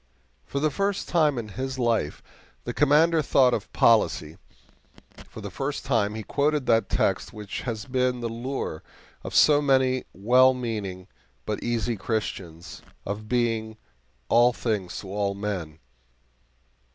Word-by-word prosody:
For 140 - -2
the 155 +1 +1
first 200 +4 -1
time 155 -5 +2
in 110 -2 -4
his 130 +5 -4
life 115 - 0 0.4
the - - -4
Commander 155 +3 +4
thought 130 -3 +4
of - - -3
policy 90 -8 +2 0.9
for 110 - -10
the 100 -1 -7
first 135 +8 -4
time 110 -5 +1
he 110 - -5
quoted 145 +3 0
that 115 -4 +2
text - - 0
which 105 -2 -6
has 110 -4 -4
been 125 -1 0
the 120 - -3
lure 115 - -4 0.4
of - - -6
so 145 -1 +6
many 130 -2 +2
well 125 +7 +4
meaning 105 -7 -4 0.4
but 105 - -3
easy 120 -1 -1
Christians, 95 -6 -4 0.2
of 105 +2 -5
being 115 -3 0 0.5
"all 120 - +5
things 105 -7 -3
to 100 - -10
all 100 0 -1
men." 95 -7 -4
115 Hz, 140 wpm, -25 LUFS, 105-130 Hz, 0.9 s, so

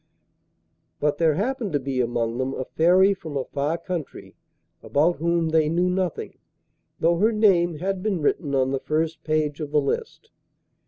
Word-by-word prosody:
But 145 0 0
there 160 -3 +3
happened 225 - -2
to 145 - +2
be 135 -1 -2
among 120 0 -1
them 130 +1 -2
a 130 - -4
Fairy 185 +7 +4
from 160 -7 -6
a 135 - -1
far 145 +5 -2
country 170 -4 -6 0.5
about 160 +5 +1
whom 170 +1 0
they 155 -1 +2
knew 175 +3 +1
nothing, 180 -2 -3 0.6
though 170 +1 +2
her 220 +4 +4
name 185 -6 +3
had 185 +4 -3
been 200 -3 -1
written 145 -1 0
on 130 0 +1
the 135 - -1
first 160 +2 -2
page 155 -1 -1
of 150 -2 -4
the 150 0 +2
list. 140 - -4
160 Hz, 170 wpm, -24 LUFS, 145-180 Hz, 0.6 s, Fairy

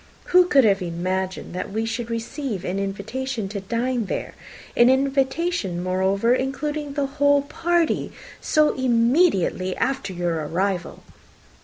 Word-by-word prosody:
Who 360 0 +7
could 275 -6 +5
have 200 -3 +3
imagined 185 +2 -3
that 185 +2 -4
we 220 +2 -1
should 230 +1 -3
receive 230 - -4
an 185 +2 -2
invitation 220 +4 -3
to 200 -1 -5
dine 235 +3 -1
there - - -4 0.4
(an 240 +1 +6
invitation, 270 - 0
moreover, 190 +5 +1
including 285 +3 -2
the 285 -1 0
whole 285 0 +2
party) 335 +3 0 0.3
so 305 -1 +3
immediately 235 - +2
after 260 -6 -1
your 175 -3 -2
arrival?" 180 +1 -2
230 Hz, 130 wpm, -23 LUFS, 190-275 Hz, 0.4 s, Who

